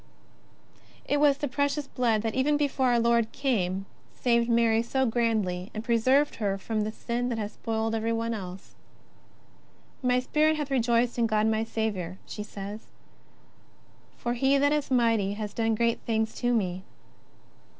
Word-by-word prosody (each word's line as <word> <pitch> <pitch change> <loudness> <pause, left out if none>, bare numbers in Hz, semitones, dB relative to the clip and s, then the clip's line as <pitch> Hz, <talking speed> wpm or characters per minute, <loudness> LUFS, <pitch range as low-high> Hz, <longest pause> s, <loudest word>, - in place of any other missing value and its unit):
It 290 - +1
was 285 -1 +4
the 290 - -2
Precious 285 +2 -1
Blood 235 -5 0
that 225 -1 -1
even 290 +3 +2
before 280 -3 +1
our 240 -1 +3
Lord 235 -1 +2
came 195 -9 -1 0.3
saved 235 -1 +2
Mary 230 -1 +3
so 265 +3 0
grandly, 220 -6 0
and 215 - -4
preserved 255 +5 +2
her 200 -3 -1
from 215 +2 -2
the 215 +1 -2
sin 240 +2 -3
that 235 - -2
has 210 -1 -3
spoilt 225 -1 -2
everyone 230 +1 -1
else: 185 -3 -8 0.7
" - - -32
My 250 - +4
spirit 305 +4 +2
hath 295 -2 -4
rejoiced 240 -1 +1
in 230 - +3
God 215 -1 +1
my 220 0 +1
Saviour," 205 -6 -3
she 210 - -7
says. 205 0 -7
^' - - -27 1.3
For 240 - -2
He 265 +3 +3
that 285 +1 +3
is 300 -1 -1
mighty 230 -6 +2
hath 210 -1 -5
done 225 -1 +1
great 230 +1 +1
things 220 -1 -1
to 245 -1 0
me." 185 -6 0
230 Hz, 165 wpm, -27 LUFS, 215-255 Hz, 1.3 s, was